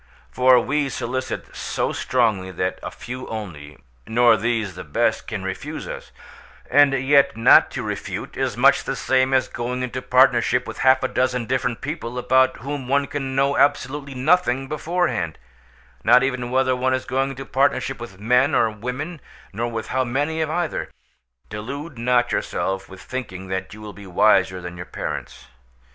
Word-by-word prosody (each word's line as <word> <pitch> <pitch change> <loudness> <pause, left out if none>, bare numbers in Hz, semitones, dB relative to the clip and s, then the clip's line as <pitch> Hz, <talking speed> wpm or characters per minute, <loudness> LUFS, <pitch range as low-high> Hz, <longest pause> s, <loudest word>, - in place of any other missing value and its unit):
For 125 0 +5
we 140 +3 0
solicit 130 +1 -4
so - - -2
strongly 110 -7 0
that 90 0 -3
a - - -5
few 125 +1 -8
only—nor 90 - -1
these 110 -3 -1
the - - -8
best—can 75 - -1
refuse - - -5
us; - - -7 0.6
and 145 0 +6
yet 135 -2 +3
not 115 - +6
to - - -5
refuse - - -4
is - - -2
much - - +5
the - - -3
same 130 0 +1
as 130 -1 +2
going 125 +1 -4
into 125 0 -4
partnership 125 -1 +3
with 110 - -7
half 130 0 +4
a - - +2
dozen 125 -2 0
different 125 0 -1
people 130 -5 -5
about 130 +1 +3
whom 140 0 -5
one 140 +2 +2
can 135 -3 -4
know 140 +1 +2
absolutely 140 0 +1
nothing 135 -2 +2
beforehand—not 75 - -1
even 125 -2 -2
whether 130 0 +2
one 130 +1 +1
is 130 - -4
going 135 +1 0
into 135 0 -7
partnership 135 -1 0
with 115 -6 -9
men 125 +7 +3
or 115 -1 +3
women, 125 +9 -5 0.3
nor 120 +4 -2
with 115 -1 -5
how 130 0 +1
many 145 +6 -1
of 155 - -1
either. 170 0 -2 0.6
Delude 130 +7 -7
not 120 0 +2
yourself 95 0 -2
with 95 -1 -12
thinking 95 -8 -6
that 95 -1 -3
you 110 +2 -11
will 105 -1 -8
be 100 -1 -12
wiser 95 0 +3
than 90 0 -8
your 90 - -7
parents. - - -6
125 Hz, 165 wpm, -22 LUFS, 105-135 Hz, 0.6 s, and